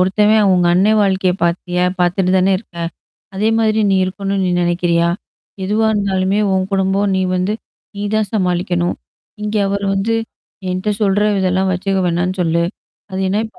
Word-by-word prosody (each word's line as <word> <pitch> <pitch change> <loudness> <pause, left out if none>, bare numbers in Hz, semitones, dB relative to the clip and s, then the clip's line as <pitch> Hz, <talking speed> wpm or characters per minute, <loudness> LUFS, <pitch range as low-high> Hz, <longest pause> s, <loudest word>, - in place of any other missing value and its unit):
"ஒருத்தவன் 210 +2 +3
உங்க 180 -1 +3
அண்ணே 200 +4 +4
வாழ்க்கையைப் 190 -2 +1
பாத்தியா? 180 +1 0 0.2
பாத்துட்டு 180 +1 +1
தான 190 +1 +3
இருக்கே. 170 -5 -7 0.5
அதே 210 +3 +1
மாரி 220 -1 +2
நீ 190 - +3
இருக்கனும்னு 195 +1 -2
நீ 180 - 0
நெனைக்கிறியா? 175 -1 +1 0.6
எதுவா 215 +3 +1
இருந்தாலுமே 195 -1 0 0.2
உன் 190 0 0
குடும்பம் 195 +1 +1
நீ 190 - +1 0.2
வந்து 185 +3 0 0.4
நீ 200 - -4
தான் 215 -2 +1
சமாளிக்கனும். 180 -3 0 0.5
இங்க 210 +1 -2
அவர் 200 0 -2
வந்து 200 +4 0 0.6
என்ட்ட 185 +3 -1
சொல்ற 205 -1 +2 0.2
இதெல்லாம் 190 0 +1
வச்சுக்க 190 +2 -1
வேணாம்னு 180 +2 0
சொல்லு. 170 0 +1 0.5
அது 190 0 -3
என்ன 205 +3 +1
இப்ப 220 - -18
190 Hz, 155 wpm, -17 LUFS, 180-200 Hz, 0.6 s, அண்ணே